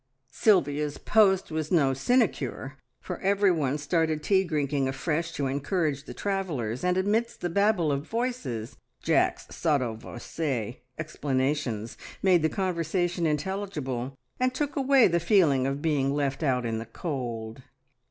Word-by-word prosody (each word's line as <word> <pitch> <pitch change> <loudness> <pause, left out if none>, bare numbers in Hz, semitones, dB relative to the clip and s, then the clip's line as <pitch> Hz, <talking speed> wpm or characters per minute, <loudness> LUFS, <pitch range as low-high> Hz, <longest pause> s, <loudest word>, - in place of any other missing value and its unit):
Sylvia's 150 -6 +2
post 190 -5 +3
was 155 -1 -3
no 140 -7 +4
sinecure, 135 - 0 0.2
for - - -6
everyone 185 -8 +2
started 155 0 0
tea 190 -1 +3
drinking 145 -5 0
afresh 160 +5 -2
to 140 - -2
encourage 145 +1 -1
the - - -8
travellers, 165 - -2
and 180 0 +2
amidst 215 +5 0
the 175 - -2
babble 200 -4 +2
of 140 +2 -2
voices 225 - -3 0.3
Jack's - - +1
sotto 140 -8 +1
voce 120 +1 -4 0.2
explanations 135 -6 -2 0.3
made 185 -3 +5
the 160 - +2
conversation 175 0 -1
intelligible, 150 -6 -3 0.2
and 255 0 +1
took 290 0 -2
away 270 -2 +5
the 170 -1 +1
feeling 165 -8 +3
of 140 +1 -3
being 145 -4 +1
left 140 0 -1
out 130 -5 +1
in 115 -1 -1
the 115 - -7
cold. 120 -5 -5
155 Hz, 135 wpm, -27 LUFS, 135-185 Hz, 0.3 s, made